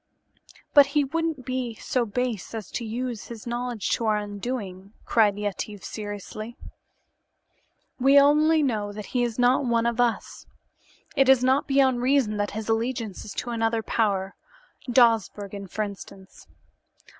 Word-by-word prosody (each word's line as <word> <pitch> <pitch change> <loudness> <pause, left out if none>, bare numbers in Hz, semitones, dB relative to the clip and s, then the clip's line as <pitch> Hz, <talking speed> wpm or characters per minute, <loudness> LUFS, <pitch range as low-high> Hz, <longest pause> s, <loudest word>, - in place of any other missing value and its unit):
"But 285 -2 +8
he 290 - +5
wouldn't 315 -2 -2
be 255 -3 -3
so 240 +2 -1
base 230 -1 -3
as 215 -4 -7
to - - -3
use 235 0 -4
his 230 -3 -9
knowledge 240 -2 -3
to 230 - 0
our 215 -1 +3
undoing," 205 -2 -5
cried 210 -3 +3
Yetive 205 0 -4
seriously. 215 +2 -7 1.4
"We 275 +2 +6
only 305 +2 +4
know 215 -6 -1
that 210 0 -7
he 250 - +2
is 235 -2 -1
not 250 +2 +3
one 235 -2 +1
of 235 +1 +1
us. 235 -2 -2 0.7
It 270 -1 +4
is 265 -2 +6
not 260 +2 +2
beyond 265 -3 +3
reason 250 -5 +2
that 205 0 -1
his 220 - -5
allegiance 225 -2 -2
is 205 - -7
to 240 - -4
another 225 -1 0
power, 195 -4 0 0.6
Dawsbergen, 210 -4 +2
for 210 +4 -2
instance. 195 -1 -10
230 Hz, 145 wpm, -25 LUFS, 210-255 Hz, 1.4 s, But